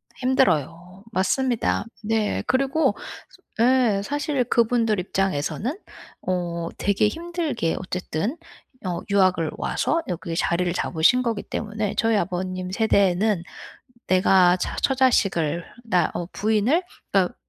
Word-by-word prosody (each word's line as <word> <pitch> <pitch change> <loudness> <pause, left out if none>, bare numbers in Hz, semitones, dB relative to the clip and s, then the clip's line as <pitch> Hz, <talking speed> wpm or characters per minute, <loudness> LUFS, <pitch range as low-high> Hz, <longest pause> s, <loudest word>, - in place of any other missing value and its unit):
힘들어요. 180 - 0
맞습니다. 230 +2 0 0.2
네. 220 -1 0
그리고 275 +4 +2 0.6
저 225 - +3
예. 240 -5 +3
사실 290 0 -1
그분들 230 -3 +2
입장에서는 195 - -1 0.5
어 170 -2 -2
되게 200 +1 +2
힘들게 325 - -2
어쨌든 185 - -3 0.5
어 175 -1 -2
유학을 185 -5 +2
와서 330 - 0
여기에 170 -2 -4
자리를 175 +1 0
잡으신 185 +10 +2
거기 230 -3 -1
때문에 210 -1 -3
저희 225 -1 +2
아버님 185 -1 -3
세대에는 200 -2 +2 0.7
'내가 185 -1 +5
자 - - -3
처자식을 195 - +2 0.2
나 180 -7 +2
어 175 - -3
부인을 220 - +2 0.3
딱 190 -3 +2
200 Hz, 255 characters per minute, -23 LUFS, 180-245 Hz, 0.7 s, 내가